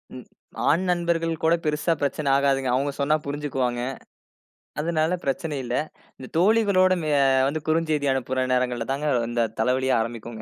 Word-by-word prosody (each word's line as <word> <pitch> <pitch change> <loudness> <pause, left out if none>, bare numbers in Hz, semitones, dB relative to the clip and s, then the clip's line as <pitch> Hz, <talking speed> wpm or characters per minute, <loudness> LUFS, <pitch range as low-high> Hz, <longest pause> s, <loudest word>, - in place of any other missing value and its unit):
ம். - - -8 0.5
ஆண் 170 +5 +3
நண்பர்கள் 170 -1 0
கூட 165 +1 +4
பெரிசா 150 +2 +1
பிரச்சன 140 0 0
ஆகாதுங்க. 135 -2 +1
அவுங்க 140 +2 0
சொன்னா 150 +2 +2
புரிஞ்சுக்குவாங்க. 135 -4 -2 1.0
அதனால 165 +2 0
பிரச்சன 145 +2 -2
இல்ல. 120 0 -3 0.4
இந்த 130 - -10
தோழிகளோட 195 -1 +4 0.3
அ - - +4 0.3
வந்து 155 +1 -3
குறுஞ்செய்தி 155 -3 +1
அனுப்புற 130 0 -1
நேரங்கள்ல 125 -2 -1
தான் 145 +2 -4 0.3
இந்த 120 -1 +1 0.2
தலைவலியே 130 +1 +1
ஆரம்பிக்குங்க 115 -1 -6
145 Hz, 140 wpm, -24 LUFS, 130-165 Hz, 1.0 s, கூட